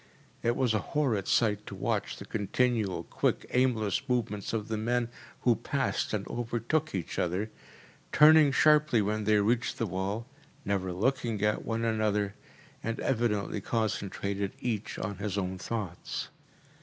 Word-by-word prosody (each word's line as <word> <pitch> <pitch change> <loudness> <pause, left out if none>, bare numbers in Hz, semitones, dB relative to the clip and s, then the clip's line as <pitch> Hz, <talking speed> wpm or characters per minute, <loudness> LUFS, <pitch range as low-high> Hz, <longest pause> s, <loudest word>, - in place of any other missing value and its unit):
It 120 0 +1
was 125 -4 +2
a 110 - +2
horrid 115 -5 0
sight 105 -2 +2
to - - -6
watch - - -1
the - - -8
continual, 105 -4 0
quick, - - 0
aimless 115 -6 +2
movements 115 -5 -1
of 110 -2 -2
the 110 - -2
men 120 +2 0 0.3
who 120 -2 +4
passed 135 +3 -1
and 105 -2 -2
overtook 120 +5 -1
each 90 - -3
other, 95 +5 -1 0.6
turning 150 -1 +7
sharply 150 -5 +4
when 105 +1 -1
they 105 0 +4
reached 115 +2 +1
the 115 - 0
wall, 100 +4 -2 0.4
never 95 -2 0
looking 115 +2 0
at 105 0 +1
one 115 0 -1
another, 105 -2 +1 0.5
and 115 0 -2
evidently 110 -5 0
concentrated 100 -2 -2
each 110 -4 -3
on 100 -2 -3
his 100 -1 -2
own 95 -1 -2
thoughts. 100 -5 -4
110 Hz, 145 wpm, -30 LUFS, 100-120 Hz, 0.6 s, turning